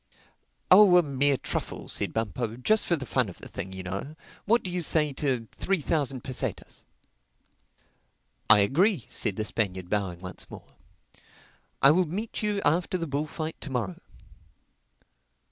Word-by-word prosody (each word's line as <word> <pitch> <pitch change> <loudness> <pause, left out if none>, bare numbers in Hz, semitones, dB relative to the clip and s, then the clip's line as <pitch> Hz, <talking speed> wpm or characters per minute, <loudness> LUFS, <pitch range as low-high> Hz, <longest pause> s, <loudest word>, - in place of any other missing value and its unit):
"Oh 185 -1 +8
a 175 - +5
mere 140 -1 +1
truffle," - - -5
said - - 0
Bumpo—"just 115 - -1
for 170 - +3
the 140 -5 -6
fun 125 -4 0
of 90 - -11
the - - -10
thing, 95 - -6
you 95 0 -6
know. 100 +12 -5 0.3
What 230 +3 +3
do 185 - -4
you 180 0 -2
say 150 -2 +2
to 130 -5 -1
three 195 -1 -1
thousand 140 -4 -1
pesetas?" 130 - -5 1.7
"I 105 -1 +8
agree," 165 - +2
said 100 - -1
the 110 - -2
Spaniard 95 -5 -2
bowing 95 -5 -1
once 95 0 -7
more. - - -12 1.1
"I 135 - +9
will 180 +2 +2
meet 205 +8 -4
you 210 -1 -1
after 175 +5 +2
the 165 - -3
bullfight 155 +2 -4
to - - -5
morrow." 115 -9 -3
140 Hz, 150 wpm, -27 LUFS, 110-175 Hz, 1.7 s, I